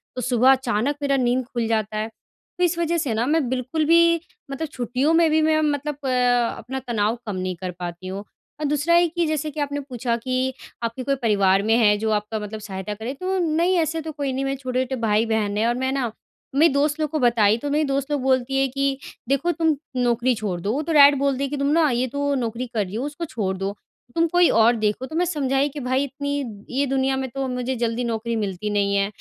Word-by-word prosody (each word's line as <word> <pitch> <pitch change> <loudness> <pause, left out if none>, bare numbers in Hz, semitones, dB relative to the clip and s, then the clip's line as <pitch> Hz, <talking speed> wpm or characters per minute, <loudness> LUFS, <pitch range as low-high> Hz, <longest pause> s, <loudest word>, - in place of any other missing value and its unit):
तो 250 - -3
सुबह 250 +1 +4
अचानक 260 0 +1
मेरा 275 -1 +1
नींद 250 0 +1
खुल 235 -3 -3
जाता 215 -1 -1
है। 215 - -1 0.5
तो 360 - +1
इस 345 -1 +2
वज़ह 340 0 +1
से 280 -8 -1
ना 225 +2 0
मैं 300 -1 +1
बिल्कुल 260 +5 -1
भी 335 +1 +5 0.3
मतलब 310 +3 -3
छुट्टियों 255 +4 0
में 330 -1 +4
भी 315 0 +3
मैं 310 0 +3
मतलब 295 -1 -1
अ, - - 0 0.5
अपना 265 +4 -5
तनाव 220 0 0
कम 210 -3 -4
नहीं 185 -1 -3
कर 185 +1 -5
पाती 175 +1 -6
हूँ। 195 +2 -5 0.4
और 305 - -2
दूसरा 295 +3 +1
है 345 0 +5
कि 340 +1 -1
जैसे 310 0 -2
कि 300 - -7
आपने 285 0 -1
पूछा 245 -3 -2
कि 255 +2 -1 0.3
आपके 230 +3 -3
कोई 275 +1 +1
परिवार 200 -4 +3
में 220 +2 +3
है 210 -3 +4
जो 220 +1 -1
आपका 210 +1 -1
मतलब 210 +1 -6
सहायता 195 0 -5
करे 225 +5 -5
तो 370 +6 -2
नहीं 340 +2 +2
ऐसे 325 0 -1
तो 315 0 -5
कोई 280 -3 -3
नहीं 270 +1 -2
मेरे 270 0 -1
छोटे-छोटे 255 0 -2
भाई 220 0 +2
बहन 215 -2 0
हैं 225 +2 +2
और 240 - +1
मैं 260 +1 -1
ना, 255 -5 -1 0.4
मेरी 305 0 +5
दोस्त 295 +2 +1
लोग 305 - 0
को 310 +1 -2
बताई, 230 -4 +4
तो 285 +5 -4
मेरी 300 +2 +2
दोस्त 275 +1 -2
लोग 290 - 0
बोलती 260 0 +1
है 270 - +3
कि, 275 +1 -1 0.3
"देखो 280 +6 +2
तुम 320 -2 +1 0.2
नौकरी 245 0 +2
छोड़ 205 -5 -3
दो, 205 - -1
वो 280 +6 -1
तो 325 +1 -2
डायरेक्ट 285 -1 +8
बोलती 275 -1 0
है 275 - -1
कि 290 - -3
तुम 280 0 0
ना 320 -1 +4
ये 250 0 0
तो 285 +3 -1
नौकरी 240 0 -2
कर 210 -3 0
रही 185 - -8
हो 245 +5 -2
उसको 295 +3 -5
छोड़ 200 -11 -2
दो। 195 +2 -3 0.4
तुम 335 0 +3
कोई 350 +1 +4
और 230 +2 +4
देखो।" 215 +3 -1
तो 315 - -8
मैं 355 +2 +2
समझाई 280 -4 0
कि, 290 +1 -7
"भाई 260 +1 0
इतनी 285 +1 -3 0.4
ये 285 - +3
दुनिया 265 0 0
में 265 0 -3
तो 270 -1 -1
मुझे 250 +1 -2
जल्दी 235 0 -1
नौकरी 230 0 -2
मिलती 205 -1 -3
नहीं 200 -1 +1
है।" 200 0 +2
260 Hz, 240 wpm, -23 LUFS, 225-290 Hz, 0.5 s, डायरेक्ट